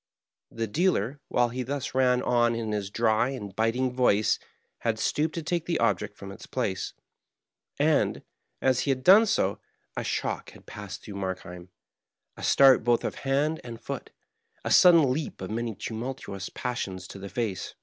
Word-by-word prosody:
• - - -17
The 115 - 0
dealer, 140 - 0
while 120 0 +2
he 125 +2 -4
thus 135 +1 -4
ran 125 -1 +3
on 120 -1 +2
in 115 -2 -3
his 105 -2 -2
dry 115 +2 +2
and 105 -8 -6
bit 115 +2 +1
ing 130 0 0
voice, 115 -4 +3 0.4
had 115 -2 -1
stooped 155 +7 0
to 165 - -3
take 170 +1 -2
the 170 -2 +1
object 105 -2 0
from 100 -1 -8
its 100 - -11
place; 100 -7 -2 0.8
and, - - +2 0.4
as 130 -1 +3
he - - -1
had 130 -1 0
done 205 - +7
so, 100 - +1 0.4
a - - -2
shock - - -3
had. - - -16
passed 100 -2 -8
through 100 -2 -8
Markheim, 90 -2 -5 0.7
a - - -11
start 135 -2 +6
both 120 -1 +2
of - - -2 0.2
hand 150 +4 +1
and 115 -2 -8
foot, - - -6 0.6
a - - -1
sudden 165 -7 +7
leap 155 +2 -4
of 95 +2 -6
many 115 -1 -2
tumultuous 110 -4 -5
passions 95 -7 -4
to 100 - -10
the 100 0 -7
face. 110 -5 -3
120 Hz, 180 wpm, -27 LUFS, 105-135 Hz, 0.8 s, done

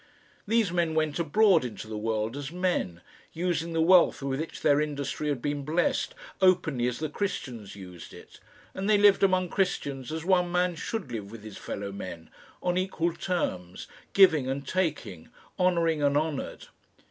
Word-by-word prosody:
These 220 -3 +2
men 170 -3 0
went 155 0 0
abroad 175 +1 +4
into 110 -3 -6
the 110 - -6
world 110 +2 -2
as 145 0 -5
men, 175 - -1 0.3
using 170 -1 -1
the 165 - +1
wealth 175 -4 +5
with 135 0 -2
which 160 - -5
their 145 +1 +4
industry 150 0 -3
had 135 -5 -2
been 145 -1 -2
blessed, 175 - 0 0.3
openly 165 -10 +3
as 125 -1 -2
the 155 - -2
Christians 130 - -4
used 90 -3 -10
it. - - -14 0.3
And 195 +2 -3
they 210 - +6
lived 205 -1 +5
among 185 -2 +3
Christians 145 -9 -2
as 160 +1 -4
one 180 -2 +3
man 180 0 +2
should 165 - -5
live 105 -4 -5
with 110 -1 -11
his 110 -2 -9
fellow 100 0 -5
men 90 -4 -8 0.3
on 180 0 +1
equal 175 -3 -1
terms, 125 - -3 0.3
giving 160 -9 +5
and 135 +1 -3
taking, 145 - -2 0.3
honouring 170 -4 +2
and 145 0 +3
honoured. 155 -2 -3
155 Hz, 170 wpm, -28 LUFS, 125-180 Hz, 0.3 s, they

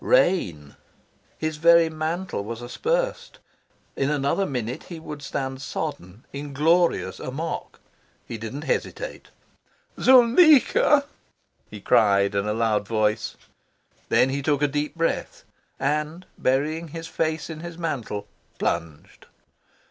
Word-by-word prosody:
Rain! 90 - +2 0.6
His 155 -1 -3
very 170 +1 +6
mantle 160 - -3
was 115 +3 -6
aspersed. - - -2 0.6
In 135 - 0
another 150 +7 +1
minute 125 -2 -4
he 170 -3 -8
would 150 -2 -8
stand 135 -1 -4
sodden, 135 - -5
inglorious, 145 - +1
a - - -5
mock. 160 +6 -5 0.5
He 115 - -6
didn't 125 +7 -6
hesitate. - - -3 0.7
"Zuleika!" 280 +3 +6 0.6
he 105 -1 -9
cried 100 -1 +3
in 100 +1 0
a 105 - 0
loud 110 -2 0
voice. 110 -1 0 0.7
Then 130 - +4
he 140 +1 -2
took 145 0 +1
a - - +5
deep 145 +3 -2
breath, 165 0 -2 0.4
and, 150 +5 -1
burying 155 +6 0
his 165 +1 -7
face 160 -1 -2
in 160 -2 -7
his 170 0 -8
mantle, 125 -11 -3 0.3
plunged. 80 -3 -4
150 Hz, 120 wpm, -24 LUFS, 115-165 Hz, 0.7 s, very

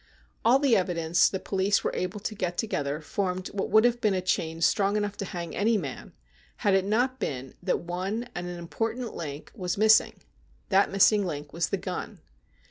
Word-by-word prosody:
All 240 +3 +6
the 275 -4 +3
evidence 175 -2 +2
the 190 - -3
police 195 +1 +1
were - - -1
able 185 +3 -3
to 215 - -3
get 180 -4 -3
together 145 -8 -2
formed 185 +3 -2
what 195 - -3
would 220 +2 +5
have 240 0 +2
been 210 -4 +2
a - - +1
chain 165 -3 -1
strong 200 +4 +2
enough 205 -1 -2
to 195 - -3
hang 170 -2 -6
any 220 +2 +2
man, 140 -9 -6 0.5
had 200 - +4
it 190 0 +3
not 250 +5 +1
been 130 -1 -4
that - - 0
one 185 +7 -3
and 175 0 -5
an 175 0 -5
important 225 +8 -3
link 145 -2 -6
was 180 -4 -3
missing 215 +1 +4 0.3
— - - -35
that 195 0 +4
missing 200 +1 +5
link 150 -5 -5
was 170 0 0
the - - 0
gun. - - -5
190 Hz, 200 wpm, -27 LUFS, 170-215 Hz, 0.5 s, All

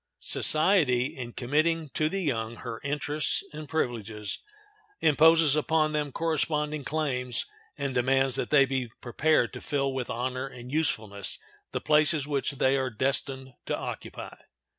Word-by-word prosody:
Society, 155 -7 +3
in 120 -2 -7
committing 155 +4 0
to 155 +3 0
the 195 +2 -2
young 115 -6 -1
her 115 -1 -7
interests 145 +1 0
and 150 -1 -8
privileges, 110 -8 -2 0.6
imposes 160 -1 +5
upon 155 0 +2
them 150 -2 -1
corresponding 150 -1 -1
claims, 125 -5 -1 0.3
and 140 -2 -2
demands 135 +1 +2
that - - -2
they 140 -2 +6
be 130 -2 -2
prepared 130 +1 +1
to - - -7
fill 140 -2 -1
with 130 -2 -3
honor 130 +3 -2
and 125 -1 -10
usefulness 110 -10 -1 0.3
the - - -2
places 150 -1 +3
which 140 -1 -1
they 135 0 +2
are 130 -1 0
destined 130 +2 -2
to - - 0
occupy. - - -7
140 Hz, 140 wpm, -28 LUFS, 125-155 Hz, 0.6 s, they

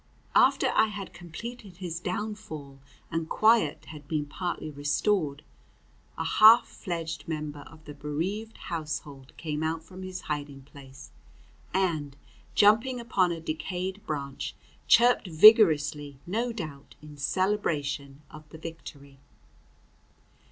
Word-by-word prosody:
After - - +4
I - - +4
had 205 -2 -7
completed 190 +3 -9
his 175 -3 -5
downfall 180 -8 -5 0.3
and 165 -1 -2
quiet 215 -9 +3
had 150 -2 -11
been 150 -1 -1
partly 155 +1 -4
restored, 145 +1 0 0.7
a - - -2
half 220 +3 +7
fledged 165 -3 -5
member 150 -2 -4
of 160 -1 -16
the 150 - -8
bereaved 175 +10 -4
household 150 -4 -6
came 155 -2 -3
out 160 0 -2
from 185 +3 -11
his 185 0 -6
hiding 145 -2 -5
place, 135 - -14 0.6
and, 160 -7 -1 0.4
jumping 225 +5 +4
upon 195 -7 +1
a 165 - -3
decayed 180 +5 -4
branch, 140 -3 -4 0.3
chirped 240 -3 +5
vigorously, 155 -6 +6
no 230 +7 -1
doubt 155 -11 -8
in 150 -1 -11
celebration 145 -5 -1
of 155 0 -13
the 160 - -11
victory. 145 -4 -10
160 Hz, 120 wpm, -28 LUFS, 145-195 Hz, 0.7 s, half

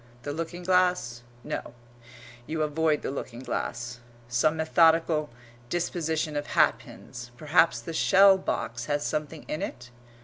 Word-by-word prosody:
The 145 - -4
looking 165 +3 -5
glass 180 -10 +1 0.2
no, - - -5 0.7
you 155 -1 -1
avoid 155 0 +1
the - - -2
looking 125 -3 -6
glass. 120 -1 -4 0.3
Some 140 +7 +1
methodical 160 -1 +3 0.4
disposition 160 -3 -1
of 145 0 -2
hat - - +3
pins. 120 0 -11
Perhaps 160 +4 +3
the 165 - -7
shell 195 +4 +6
box 120 -9 -3
has 145 +2 -1
something 155 0 -3
in 155 - -3
it? 125 0 -6
155 Hz, 135 wpm, -27 LUFS, 130-165 Hz, 0.7 s, shell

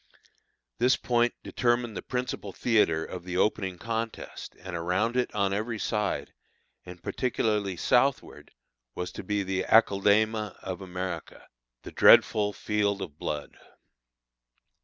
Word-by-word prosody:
This 125 +2 +4
point 120 -1 +1
determined 120 -2 0
the - - -4
principal 125 -5 -4
theatre 95 -9 +2
of 90 -1 -7
the 90 0 -4
opening 95 -2 0
contest, 115 +2 -5
and 90 -1 -7
around 90 +8 0
it 125 -1 +1
on 100 -2 +1
every 110 +3 -2
side, 105 -1 -2 0.5
and 90 -1 -11
particularly 105 -6 -1
southward, 130 +8 +1 0.5
was 90 - -4
to - - -8
be 105 -1 -1
the 95 0 -1
aceldama 105 0 +3
of 95 -1 -5
America, 90 -3 -6 0.4
the - - -8
dreadful 105 -1 +6
"field 105 -1 -1
of 75 -5 -10
blood." 75 -1 -4
105 Hz, 125 wpm, -28 LUFS, 95-115 Hz, 0.5 s, dreadful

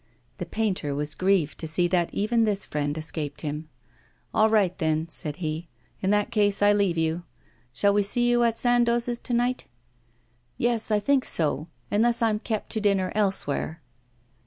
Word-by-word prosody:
The - - -4
painter 190 -10 -2
was 150 +1 -1
grieved 185 -5 +1
to 160 - -4
see 175 +3 +2
that 175 -2 +1
even 225 +3 +1
this 205 -2 0
friend 145 0 -2
escaped 155 -2 -3
him. 150 0 -5 0.6
'All 220 0 +4
right, 200 -5 +2
then,' 160 -1 0
said 150 -2 -5
he; 160 0 -4 0.3
'in 190 - 0
that 210 +2 +1
case 205 -3 +2
I 205 0 +6
leave 200 -4 +1
you. 160 +1 0 0.5
Shall 200 +11 +2
we 205 - +3
see 240 +5 +1
you 240 0 +3
at 230 -1 +1
Sandoz's 240 0 +2
to 245 - -5
night?' 245 +2 0 0.9
'Yes, 235 -2 0
I 210 -1 +3
think 265 +5 +2
so; 155 -1 -1 0.2
unless 235 +3 +2
I'm 215 -2 +2
kept 215 -1 -4
to 220 - -1
dinner 195 -3 +1
elsewhere. 190 -6 -1
200 Hz, 170 wpm, -25 LUFS, 160-225 Hz, 0.9 s, I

